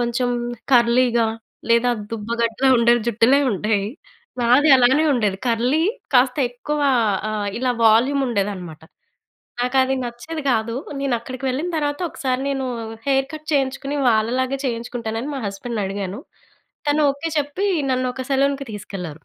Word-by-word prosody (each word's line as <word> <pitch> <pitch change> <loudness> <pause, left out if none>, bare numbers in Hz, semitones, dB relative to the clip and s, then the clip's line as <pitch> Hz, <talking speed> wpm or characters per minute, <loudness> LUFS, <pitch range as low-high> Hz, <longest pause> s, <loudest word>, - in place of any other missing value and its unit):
కొంచెం 240 +1 0 0.4
కర్లీగా 235 -1 +4 0.4
లేదా 235 +1 +4 0.2
దుబ్బ 215 -2 -5
గడ్డలా 230 +3 +1
ఉండే 235 0 +4
జుట్టులే 235 +4 +4
ఉంటాయి. 205 0 0 0.6
నాది 250 +6 +4
అలానే 260 +5 +4
ఉండేది 210 -6 0
కర్లీ 245 +6 +1 0.3
కాస్త 250 +1 +4
ఎక్కువ 295 +5 -4 0.5
ఆహ్, 210 -1 -2
ఇలా 255 0 0
వాల్యూమ్ 250 +6 +4
ఉండేది 205 -4 0
అనమాట. 170 -5 -9 0.8
నాకు 250 +2 0
అది 265 +1 0
నచ్చేది 245 +7 -6
గాదు. 230 -1 0 0.3
నేను 275 -3 0
అక్కడికి 255 +3 -8
వెళ్ళిన 280 +7 -2
తర్వాత 290 0 -1
ఒకసారి 260 -3 -2
నేను 270 -1 -2 0.4
హెయిర్ 270 -1 +2
కట్ 310 0 -9
చేయించుకుని 275 0 -1
వాళ్ళలాగే 250 +4 +1
చేయించుకుంటానని 235 0 -3
మా - - -3
హస్బెండ్‌ని 210 +2 -4
అడిగాను. 195 +1 -4 0.7
తను 290 +1 +2
ఓకే 285 +4 -5
చెప్పి 295 +8 -1 0.2
నన్ను 255 0 0
ఒక 260 - -5
సెలూన్‍కి 275 0 +1
తీసుకెళ్లారు. 180 -6 -7
245 Hz, 135 wpm, -21 LUFS, 225-270 Hz, 0.8 s, కర్లీగా